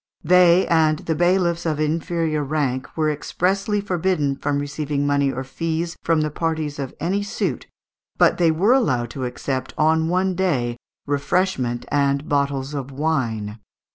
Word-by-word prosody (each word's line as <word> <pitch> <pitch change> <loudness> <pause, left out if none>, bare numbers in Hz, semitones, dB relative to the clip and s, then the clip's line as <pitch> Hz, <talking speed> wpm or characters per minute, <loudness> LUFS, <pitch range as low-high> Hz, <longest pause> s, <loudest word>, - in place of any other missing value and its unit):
They 180 +1 +5
and 155 -2 +3
the 160 - -2
bailiffs 175 0 +2
of 155 -3 -1
inferior 155 0 0
rank 135 -3 -2
were 155 -1 +2
expressly 195 +7 -1
forbidden 180 -7 0
from 140 +1 -1
receiving 145 0 -2
money 140 -1 +2
or 130 0 -4
fees 165 +4 -3
from 165 -2 +2
the 155 0 -1
parties 155 -2 -2
in 135 -2 -4
any 190 +5 0
suit, 205 - -3 0.5
but - - +4
they 170 -2 +4
were 185 +9 +3
allowed 130 - +1
to 130 -2 -4
accept 130 +1 -4
on 160 +1 +2
one 185 +1 +1
day 140 -11 0 0.3
refreshment 140 -4 0
and 140 0 +1
bottles 140 -1 -1
of 140 -2 -4
wine. 120 -8 -2
155 Hz, 150 wpm, -22 LUFS, 140-170 Hz, 0.5 s, They